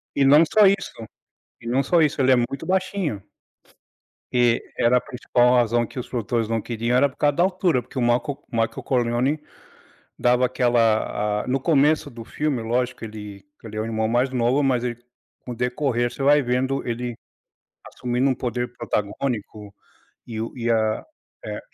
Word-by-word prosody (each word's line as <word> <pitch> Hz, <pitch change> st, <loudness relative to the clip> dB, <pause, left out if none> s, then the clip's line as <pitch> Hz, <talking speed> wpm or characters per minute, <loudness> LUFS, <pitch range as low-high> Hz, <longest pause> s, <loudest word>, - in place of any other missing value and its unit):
E 140 Hz, -, +3 dB
não 150 Hz, +4 st, +7 dB
só 210 Hz, +6 st, +4 dB
isso 195 Hz, -, -1 dB, 0.6 s
e 115 Hz, -, -9 dB
não 130 Hz, +3 st, +1 dB
só 170 Hz, +4 st, +3 dB
isso, 150 Hz, -2 st, +1 dB
ele 130 Hz, 0 st, +4 dB
é -, -, +7 dB
muito 130 Hz, +5 st, -2 dB
baixinho. 185 Hz, -, -1 dB, 1.1 s
E 120 Hz, -1 st, +3 dB, 0.2 s
era 120 Hz, +2 st, +4 dB
a -, -, 0 dB
principal 125 Hz, 0 st, +1 dB
razão 120 Hz, -1 st, +2 dB
que 125 Hz, -, -8 dB
os 125 Hz, -, -6 dB
produtores 115 Hz, -1 st, -2 dB
não 115 Hz, 0 st, -1 dB
queriam 115 Hz, +2 st, -2 dB
era 140 Hz, +2 st, +4 dB
por -, -, -21 dB
causa 145 Hz, -1 st, +2 dB
da 170 Hz, -, +3 dB
altura, 180 Hz, -8 st, +1 dB
porque 130 Hz, -, -7 dB
o -, -, 0 dB
Marco 125 Hz, +4 st, 0 dB
Michael 115 Hz, -1 st, -1 dB
Corleone, 125 Hz, +3 st, 0 dB, 0.8 s
dava 125 Hz, +1 st, +3 dB
aquela 115 Hz, -4 st, +1 dB
a -, -, -11 dB
no 135 Hz, +2 st, +1 dB
começo 150 Hz, 0 st, +2 dB
do 115 Hz, -1 st, -10 dB
filme, 145 Hz, -1 st, -2 dB
lógico 120 Hz, +2 st, -1 dB
que -, -, -6 dB
ele 105 Hz, -1 st, -9 dB
que 115 Hz, -, -17 dB
ele 110 Hz, -, -8 dB
é 110 Hz, -, 0 dB
o -, -, -3 dB
irmão 110 Hz, -1 st, -1 dB
mais 125 Hz, +3 st, +2 dB
novo, 125 Hz, +2 st, +1 dB
mas 130 Hz, -3 st, +1 dB
ele 120 Hz, -1 st, -3 dB, 0.5 s
com 125 Hz, -, -6 dB
o -, -, -9 dB
decorrer, 125 Hz, 0 st, -1 dB
você 135 Hz, -, -8 dB
vai 145 Hz, +2 st, +5 dB
vendo 130 Hz, +2 st, -1 dB
ele 120 Hz, 0 st, -3 dB, 0.7 s
assumindo 125 Hz, +2 st, -1 dB
um 130 Hz, -, +1 dB
poder 120 Hz, 0 st, -3 dB
protagônico, 105 Hz, -2 st, -3 dB, 0.5 s
e 110 Hz, -2 st, -4 dB
o 115 Hz, -, -4 dB
e 120 Hz, -1 st, -2 dB
a 110 Hz, -1 st, +1 dB, 0.4 s
é. -, -, -5 dB
125 Hz, 185 wpm, -23 LUFS, 115-135 Hz, 1.1 s, não